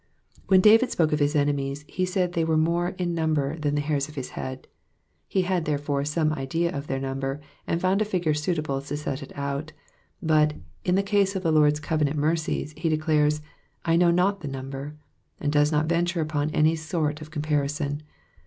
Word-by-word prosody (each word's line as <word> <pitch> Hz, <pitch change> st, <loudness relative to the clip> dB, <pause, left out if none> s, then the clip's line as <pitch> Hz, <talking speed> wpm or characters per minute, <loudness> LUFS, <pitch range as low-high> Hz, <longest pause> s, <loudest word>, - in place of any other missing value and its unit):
When 190 Hz, -1 st, +6 dB
David 225 Hz, +5 st, +6 dB
spoke 160 Hz, -3 st, +1 dB
of 150 Hz, -, +1 dB
his 145 Hz, +1 st, +1 dB
enemies, 145 Hz, 0 st, 0 dB
he 185 Hz, 0 st, -1 dB
said 180 Hz, -1 st, 0 dB
they 165 Hz, -, +1 dB
were 160 Hz, -1 st, +2 dB
more 170 Hz, +3 st, +1 dB
in 175 Hz, -1 st, -1 dB
number 160 Hz, -2 st, 0 dB
than 145 Hz, -1 st, 0 dB
the 145 Hz, -, +1 dB
hairs 145 Hz, -1 st, -1 dB
of 150 Hz, -, -12 dB
his 135 Hz, -3 st, -4 dB
head; 130 Hz, 0 st, -6 dB, 0.6 s
he 190 Hz, -, +1 dB
had, 180 Hz, -3 st, 0 dB
therefore, 145 Hz, -1 st, -1 dB
some 155 Hz, +1 st, +1 dB
idea 165 Hz, +5 st, -1 dB
of 140 Hz, +1 st, -5 dB
their 135 Hz, -, -1 dB
number, 135 Hz, +1 st, -3 dB, 0.3 s
and 165 Hz, -, 0 dB
found 185 Hz, +3 st, +2 dB
a -, -, +5 dB
figtire 180 Hz, -7 st, 0 dB
suitable 150 Hz, -3 st, -1 dB
to 145 Hz, +1 st, -4 dB
set 145 Hz, -1 st, -4 dB
it 140 Hz, -, -9 dB
out; 140 Hz, +2 st, -3 dB, 0.5 s
but, 155 Hz, -4 st, +3 dB, 0.3 s
in 180 Hz, -, +2 dB
the 195 Hz, -, +2 dB
case 200 Hz, -1 st, +2 dB
of 190 Hz, -, -2 dB
the 165 Hz, -, +2 dB
Lord's 150 Hz, -1 st, +4 dB
covenant 155 Hz, -1 st, 0 dB
mercies, 155 Hz, 0 st, 0 dB
he 165 Hz, +2 st, -1 dB
declares, 150 Hz, -1 st, +2 dB, 0.2 s
" -, -, -39 dB
I 165 Hz, -1 st, +3 dB
know 175 Hz, 0 st, +5 dB
not 185 Hz, +3 st, +2 dB
the 150 Hz, -, -5 dB
number," 135 Hz, +2 st, -6 dB, 0.4 s
and 145 Hz, -, -1 dB
does 145 Hz, 0 st, +3 dB
not 150 Hz, 0 st, +2 dB
venture 170 Hz, +1 st, +1 dB
upon 150 Hz, -1 st, -1 dB
any 155 Hz, +1 st, +3 dB
sort 155 Hz, -1 st, -2 dB
of 155 Hz, -, -9 dB
comparison. 150 Hz, -1 st, -1 dB
155 Hz, 200 wpm, -26 LUFS, 145-170 Hz, 0.6 s, When